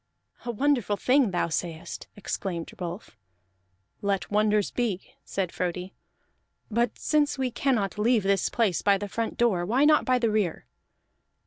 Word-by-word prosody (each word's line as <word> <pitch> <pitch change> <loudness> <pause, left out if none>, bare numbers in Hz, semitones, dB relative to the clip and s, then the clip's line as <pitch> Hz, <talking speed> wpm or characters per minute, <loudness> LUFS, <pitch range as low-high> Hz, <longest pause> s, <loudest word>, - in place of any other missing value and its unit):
"A - - -4
wonderful 240 -4 +1
thing 260 0 +3
thou 175 -2 0
sayest!" 165 0 -4
exclaimed 190 -4 -4
Rolf. 175 +3 -6 0.9
"Let 200 -1 -1
wonders 210 0 +2
be," 220 -7 -2
said 190 -3 -2
Frodi. 180 +1 -3 0.8
"But 235 +1 +1
since 295 -2 +1
we 260 -2 -1
cannot 230 -6 0
leave 225 0 +3
this 195 0 +2
place 220 -8 +1
by 200 -1 +4
the 205 +1 -5
front 225 +3 -3
door, 215 -7 +2
why 245 +10 +3
not 305 0 +5
by 255 0 +3
the 230 -3 +1
rear?" 205 -6 0
210 Hz, 145 wpm, -27 LUFS, 190-240 Hz, 0.9 s, not